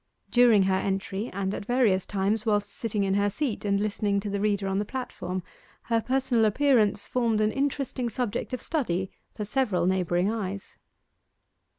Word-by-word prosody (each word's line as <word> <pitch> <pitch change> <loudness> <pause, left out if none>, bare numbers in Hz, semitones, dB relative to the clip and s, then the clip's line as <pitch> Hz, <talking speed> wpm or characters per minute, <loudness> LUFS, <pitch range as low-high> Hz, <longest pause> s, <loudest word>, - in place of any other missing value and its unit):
During 240 -5 +6
her 190 0 +2
entry, 195 +3 -2
and 195 0 -2
at - - -4
various 230 -7 +2
times 205 +2 0
whilst 210 -2 0
sitting 215 -3 -2
in 195 -1 +1
her 205 +1 +2
seat 250 +1 -3
and 200 -1 +1
listening 205 -1 0
to 205 0 -4
the 200 - -1
reader 200 -1 0
on 195 0 0
the - - +1
platform, 185 -7 -5 0.4
her 230 -1 +1
personal 250 -1 +2
appearance 215 -3 +3
formed 230 -3 +1
an 215 0 +2
interesting 270 -2 -1
subject 235 0 -3
of 255 - -4
study 190 - -1 0.2
for 210 - -4
several 210 -6 +1
neighbouring 180 +1 +1
eyes. 200 -3 -5
210 Hz, 170 wpm, -27 LUFS, 195-240 Hz, 0.4 s, During